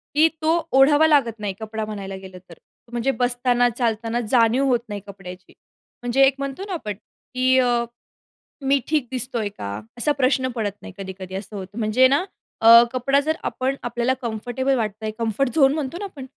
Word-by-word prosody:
की 310 +2 +6
तो 320 +2 +3 0.2
ओढावा 290 +4 +6
लागत 250 -8 +2
नाही 205 -2 -3
कपडा 220 0 -4
म्हणायला 200 -2 -6
गेलं 190 -1 -10
तर. - - -11 0.4
म्हणजे 240 +2 0
बसताना, 245 0 +2
चालताना 230 -1 -1
जाणीव 240 +2 +3
होत 250 -3 +3
नाही 205 -1 -5
कपड्याची. 185 -2 -11 0.5
म्हणजे 245 +2 +1
एक 270 0 +2
म्हणतो 275 +6 -4
ना 390 - -4
आपण 215 - -4 0.4
की 255 +1 +3
अ, 255 - +3 0.9
"मी 275 +1 +2
ठीक 300 -5 0
दिसतोय 250 -4 -2
का?" 100 - -5 0.3
असा 295 +5 +1
प्रश्न 260 -1 +2
पडत 215 -3 -1
नाही - - -10
कधी-कधी 190 -1 -7
असं 200 +2 -7
होतं. 195 +2 -8
म्हणजे 225 +4 +4
ना 280 +6 +2 0.4
अ, 225 - +4 0.3
कपडा 275 +2 +2
जर 315 0 +1
आपण 260 +1 -1
आपल्याला 240 +1 0
कम्फर्टेबल 245 +4 -1
वाटतोय, 215 -2 -3
कम्फर्ट 230 +3 0
झोन 275 -3 +5
म्हणतो 300 0 -3
ना 405 - -4
आपण. 285 -9 -9
245 Hz, 175 wpm, -22 LUFS, 215-270 Hz, 0.9 s, की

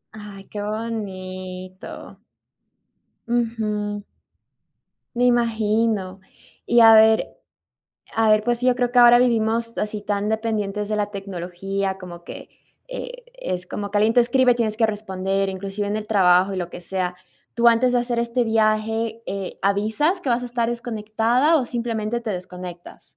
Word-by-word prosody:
Ay, 205 -2 -11
qué 205 - -5
bonito. 185 -4 -6 1.0
Ujú. 215 -3 -2 1.1
Me 245 +1 +2
imagino. 220 -5 +1 0.5
Y 240 - +4
a 225 0 +9
ver 220 0 +5 0.9
a 225 -1 +3
ver, 215 0 +4
pues 240 0 +1
sí, 250 - -1
yo 250 -1 +3
creo 245 -1 0
que 250 - +3
ahora 240 0 +8
vivimos 230 -1 +1
así 210 0 -2
tan 205 0 -2
dependientes 210 -2 -2
de 215 - -1
la 205 0 -1
tecnología, 195 0 -4
como 175 -2 -10
que, - - -10 0.4
e - - -7
es 185 - -4
como 200 +2 -5
que 205 - +1
alguien 220 +2 +3
te 245 - +6
escribe, 250 +1 +4
tienes 220 -3 -1
que 225 0 +3
responder, 195 -2 -2
inclusive 195 +2 -4
en 210 - -1
el 215 0 -5
trabajo 190 -2 +4
y - - -4
lo 175 -1 -4
que 175 - -9
sea, 180 0 -3 0.4
¿tú 235 +1 +2
antes 235 +2 +5
de 245 - +3
hacer 240 -1 -1
este 235 +1 0
viaje, 220 +1 0
eh, 195 -1 -5
avisas 215 - +1
que 275 - -5
vas 245 0 +1
a - - -4
estar 235 -1 -1
desconectada 235 +5 +1
o 265 - +1
simplemente 235 -1 -2
te 225 - -4
desconectas? 180 -1 -8
215 Hz, 160 wpm, -22 LUFS, 195-235 Hz, 1.1 s, a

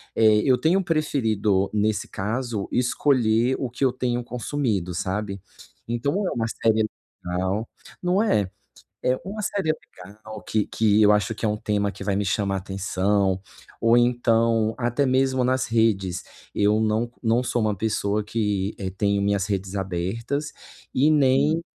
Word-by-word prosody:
eh, 110 -1 +5
eu 130 -1 +4
tenho 175 +7 +2
preferido, 110 - +1
nesse 105 0 0
caso, 110 +1 -3
escolher 125 -1 +2
o 130 - -2
que 125 +4 -4
eu 130 - +3
tenho 125 -1 -2
consumido, 120 -7 -2
sabe, 100 +2 -3 0.5
então 120 +4 -1
é - - -1
uma 115 -1 -1
série 110 -1 +1 0.4
legal, 95 +5 -1 0.4
não 180 +3 +2
é. 105 - +1 0.6
É 125 0 +2
uma 205 +3 -5
série 190 -6 0 0.2
legal 105 +3 -11
que 110 -2 0
que 110 -1 +2
eu 105 - +6
acho 105 +1 +1
que - - -3
é - - +3
um 105 - -1
tema 105 -1 -1
que 100 - -9
vai 100 -1 0
me 100 +1 0
chamar 100 0 0
a - - 0
atenção 95 0 0 0.4
ou 115 +1 +4
então 115 -2 +2
até 120 +4 +1
mesmo 130 0 +2
nas 130 0 +1
redes 100 -5 +1 0.3
eu 105 +1 +3
não 110 +2 0
não 115 +2 +2
sou 120 -1 -1
uma 105 -1 +1
pessoa 105 0 -1
que 105 -2 -1
é, 95 - -3
tenho 100 +1 0
minhas 100 -1 +1
redes 100 -1 -3
abertas 100 - -3 0.4
e 150 +4 +4
nem 145 +3 +3
110 Hz, 160 wpm, -24 LUFS, 100-125 Hz, 0.6 s, eu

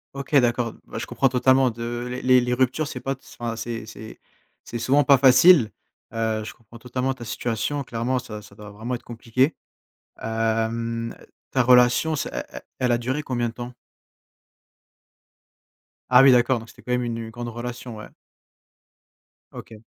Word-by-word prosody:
OK 140 +1 -4
d'accord, 120 -2 +1
bah, - - -8
je - - -3
comprends 135 - +1
totalement 130 +1 +3
de 120 +1 -5 0.2
les 130 0 +5
les 125 0 -1
ruptures 130 +4 +1
c'est - - -6
pas 135 - -3
s 135 0 -8
enfin, 115 -1 -3
c'est 115 -1 -5
c'est 110 0 -11 0.4
c'est 120 - -6
souvent 140 +5 +3
pas 140 -1 +5
facile, 130 0 +6 0.4
heu, 110 -1 -1
je 105 - -7
comprends 115 0 -16
totalement 125 +2 -2
ta 120 -2 -10
situation, 120 +5 -2
clairement, 120 +1 -2
ça 110 -4 -6
ça 100 -1 -16
doit 105 -1 -11
vraiment 115 +5 -4
être - - -9
compliqué, 120 +5 0 0.6
hem, 115 +1 -2 0.4
ta 130 - +2
relation, 125 +5 +4
c'est - - -3
elle - - -4
elle - - -8 0.2
elle 125 -1 +1
a 120 - +3
duré 130 +5 -2
combien 120 -5 -2
de - - -10
temps? 120 +1 -7 2.4
Ah 125 +1 +8
oui, 135 - +8
d'accord! 125 +1 +4
Donc 115 0 -10
c'était - - -16
quand 125 - -6
même 125 0 +1
une 120 -1 -3
une 115 -1 -6
grande 120 +1 -6
relation, 120 0 -7
ouais. 105 - -10 1.4
OK. 110 -2 -11
120 Hz, 175 wpm, -23 LUFS, 115-130 Hz, 2.4 s, Ah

